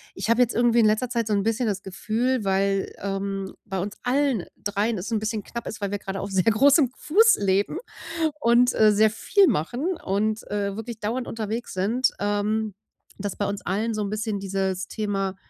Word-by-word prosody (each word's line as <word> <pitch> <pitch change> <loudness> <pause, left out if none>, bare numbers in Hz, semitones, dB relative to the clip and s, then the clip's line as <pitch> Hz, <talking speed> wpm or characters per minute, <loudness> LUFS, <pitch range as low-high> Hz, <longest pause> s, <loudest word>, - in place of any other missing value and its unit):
Ich - - -4
habe 230 +2 +4
jetzt 245 - +2
irgendwie 240 0 +4
in 220 - +5
letzter 220 +3 +2
Zeit 235 -3 -1
so 210 - 0
'n 200 -1 +1
bisschen 225 +2 0
das 200 -1 -2
Gefühl, 220 +4 -1
weil, 195 0 +1
ähm, 195 0 -3
bei 195 -3 -3
uns 200 +3 -4
allen 255 -5 +1
dreien 210 +2 -1
es 205 +6 -5
'n 220 - +1
bisschen 215 -1 -3
knapp 235 - -7
ist, 215 - -6
weil 200 0 -2
wir 205 - -2
grade 195 0 -5
auf 195 0 -5
sehr 185 -2 +2
großem 270 +5 +5
Fuß 445 +8 +4
leben 200 - +1 0.6
und, 240 +1 +4
äh, 215 -1 +6
sehr 215 +1 +5
viel 385 - +3
machen 255 - -1
und, 215 +3 0
äh, 200 -1 -1
wirklich 225 0 -6
dauernd 235 +4 -2
unterwegs 225 +1 -4
sind, 225 +7 +1
ähm, 205 0 -1 0.4
dass 205 -1 -4
bei 205 - 0
uns 200 0 -3
allen 215 +4 -1
so 215 - -2
'n 200 - -3
bisschen 215 -1 -2
dieses 190 -1 -2
Thema 195 -3 -2
215 Hz, 200 wpm, -25 LUFS, 195-235 Hz, 0.6 s, äh